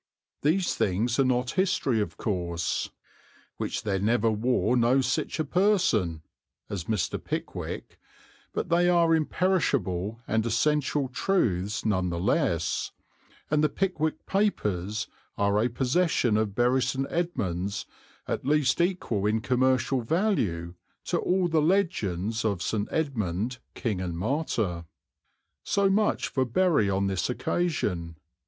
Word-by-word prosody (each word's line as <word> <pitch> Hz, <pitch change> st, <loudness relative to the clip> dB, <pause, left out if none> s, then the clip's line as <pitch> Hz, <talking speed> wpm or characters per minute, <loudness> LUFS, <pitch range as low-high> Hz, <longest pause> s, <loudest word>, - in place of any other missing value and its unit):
These 175 Hz, +5 st, +2 dB
things 110 Hz, +7 st, 0 dB
are -, -, +6 dB
not 125 Hz, -1 st, +1 dB
history 170 Hz, -, +1 dB
of 105 Hz, -, -4 dB
course, 85 Hz, -5 st, -2 dB, 0.7 s
"which -, -, -3 dB
there 100 Hz, -2 st, 0 dB
never 115 Hz, +2 st, +2 dB
war 120 Hz, +3 st, +1 dB
no 120 Hz, +2 st, +4 dB
sich 130 Hz, +4 st, -1 dB
a 155 Hz, -, +1 dB
person" 140 Hz, -, +2 dB, 0.5 s
as 95 Hz, -5 st, -3 dB
Mr. 105 Hz, -3 st, -1 dB
Pickwick, -, -, -5 dB, 0.5 s
but -, -, -3 dB
they 175 Hz, +1 st, +4 dB
are 170 Hz, -2 st, +4 dB
imperishable 140 Hz, -, 0 dB
and 110 Hz, 0 st, +1 dB
essential 145 Hz, +4 st, +1 dB
truths 110 Hz, -, 0 dB
none 95 Hz, -4 st, +1 dB
the 85 Hz, 0 st, -3 dB
less, 90 Hz, -, 0 dB, 0.6 s
and 150 Hz, 0 st, +3 dB
the 155 Hz, -, +4 dB
Pickwick 160 Hz, -5 st, -1 dB
Papers 105 Hz, -, 0 dB, 0.3 s
are 100 Hz, 0 st, +2 dB
a 120 Hz, -, +2 dB
possession 130 Hz, -1 st, +1 dB
of 105 Hz, -2 st, 0 dB
Bury 125 Hz, +2 st, +3 dB
St. 130 Hz, +2 st, -1 dB
Edmunds 100 Hz, -, -2 dB, 0.4 s
at -, -, -2 dB
least 145 Hz, +1 st, +2 dB
equal 170 Hz, -, 0 dB
in 110 Hz, +1 st, +2 dB
commercial 130 Hz, +2 st, +1 dB
value 115 Hz, -, 0 dB, 0.3 s
to -, -, 0 dB
all 185 Hz, 0 st, +1 dB
the 160 Hz, -2 st, +2 dB
legends 115 Hz, -, 0 dB
of 100 Hz, -5 st, 0 dB
St. 105 Hz, -2 st, -1 dB
Edmund, 120 Hz, -, -2 dB, 0.2 s
King 105 Hz, -6 st, -2 dB
and 85 Hz, -3 st, -3 dB
Martyr. 105 Hz, -, -1 dB, 0.8 s
So 200 Hz, -1 st, +2 dB
much 210 Hz, +2 st, +1 dB
for 130 Hz, -, 0 dB
Bury 140 Hz, -, +2 dB
on 100 Hz, 0 st, +1 dB
this 95 Hz, 0 st, -1 dB
occasion. 105 Hz, -, -1 dB
120 Hz, 130 wpm, -27 LUFS, 100-160 Hz, 0.8 s, are